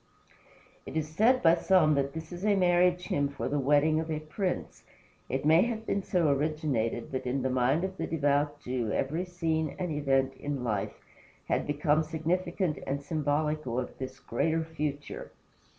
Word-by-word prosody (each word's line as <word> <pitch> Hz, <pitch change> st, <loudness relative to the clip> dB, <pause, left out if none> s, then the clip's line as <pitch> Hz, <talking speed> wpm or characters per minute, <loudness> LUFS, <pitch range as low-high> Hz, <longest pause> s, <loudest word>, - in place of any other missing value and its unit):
It -, -, -4 dB
is 155 Hz, -1 st, -1 dB
said 230 Hz, +10 st, +3 dB
by 165 Hz, -1 st, +7 dB
some 170 Hz, -3 st, +4 dB
that 140 Hz, -1 st, 0 dB
this 160 Hz, +1 st, -7 dB
is 175 Hz, +1 st, -7 dB
a 210 Hz, -1 st, +3 dB
marriage 180 Hz, -1 st, +3 dB
hymn 145 Hz, 0 st, +1 dB
for 140 Hz, -, -4 dB
the 145 Hz, +2 st, 0 dB
wedding 145 Hz, +3 st, +3 dB
of 160 Hz, 0 st, -4 dB
a 155 Hz, -1 st, -1 dB
prince. 175 Hz, +5 st, -4 dB, 0.5 s
It 135 Hz, +2 st, -2 dB
may 160 Hz, +3 st, +6 dB
have 225 Hz, 0 st, -1 dB
been 200 Hz, -, 0 dB
so 175 Hz, -4 st, +1 dB
originated; 140 Hz, -6 st, -1 dB
but 130 Hz, -1 st, -3 dB
in 130 Hz, +1 st, -1 dB
the 130 Hz, -, 0 dB
mind 130 Hz, +6 st, +2 dB
of 190 Hz, 0 st, -3 dB
the -, -, -2 dB
devout 145 Hz, -1 st, +1 dB
Jew 125 Hz, -4 st, -2 dB
every 160 Hz, +7 st, -1 dB
scene 160 Hz, -4 st, -1 dB
and 180 Hz, -3 st, -2 dB
event 135 Hz, -2 st, +1 dB
in 140 Hz, -1 st, -4 dB
life 105 Hz, -5 st, -2 dB, 0.5 s
had -, -, 0 dB
become 150 Hz, +1 st, +2 dB
significant 165 Hz, +1 st, -1 dB
and 140 Hz, +1 st, -2 dB
symbolical 150 Hz, -4 st, -1 dB
of -, -, -5 dB
this 130 Hz, 0 st, -6 dB
greater 160 Hz, +3 st, 0 dB
future. 150 Hz, -3 st, -5 dB
155 Hz, 175 wpm, -29 LUFS, 140-170 Hz, 0.5 s, by